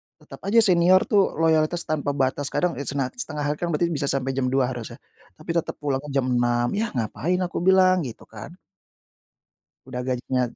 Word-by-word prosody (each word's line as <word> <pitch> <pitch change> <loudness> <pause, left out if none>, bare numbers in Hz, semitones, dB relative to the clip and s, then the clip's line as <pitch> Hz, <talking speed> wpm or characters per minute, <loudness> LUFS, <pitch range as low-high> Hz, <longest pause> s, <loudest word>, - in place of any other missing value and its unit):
tetap - - -14
aja 230 +3 +5
senior 185 -1 +5
tuh 200 -2 +2
loyalitas 160 +1 +2
tanpa 145 -2 -2
batas. 135 +1 0
Kadang, 180 +4 0
eee, 140 - -5
senat 135 -2 -1
setengah 150 -10 -4
hari 145 +1 -2
kan 175 - -2
berarti 170 +1 0
bisa 145 -3 -2
sampai 135 -1 0
jam 130 -1 -1
2.00 130 0 +1
harusnya, 120 -3 -7 0.4
tapi 165 - -6
tetap 170 -1 -2
pulangnya 140 0 -2
jam 135 - +2
6.00 120 0 +1
"Yah, 225 -10 -3
ngapain," 140 +10 -1
aku 175 - -3
bilang 185 0 +4
gitu 115 - -10
kan. 110 +10 -11 1.3
Udah 125 -1 -5
gajinya 125 0 -1
145 Hz, 180 wpm, -24 LUFS, 130-175 Hz, 1.3 s, aja